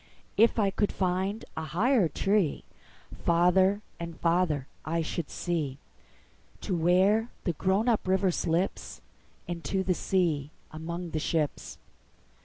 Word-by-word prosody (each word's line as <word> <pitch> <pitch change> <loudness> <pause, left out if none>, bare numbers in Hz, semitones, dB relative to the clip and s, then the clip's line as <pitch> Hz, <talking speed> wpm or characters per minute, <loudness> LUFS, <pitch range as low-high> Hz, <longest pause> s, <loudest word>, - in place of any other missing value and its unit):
If 230 +3 +4
I 200 -3 +2
could 205 +1 0
find 190 +3 -1
a 160 - -3
higher 195 - +2
treeFarther 185 +1 +1 0.2
and 170 -1 -6
farther 165 -5 +1 0.2
I 165 +2 -1
should 160 0 -4
see, 155 -7 -2 0.8
To 190 - -2
where 190 +7 +3
the 175 - 0
grown 190 +8 +1
up 225 -5 +1
river 190 0 +3
slipsInto 175 +1 -3
the 185 - +2
sea 165 -7 0 0.2
among 170 +2 -5
the 155 - -1
ships. 155 -1 -2
180 Hz, 115 wpm, -28 LUFS, 165-195 Hz, 0.8 s, If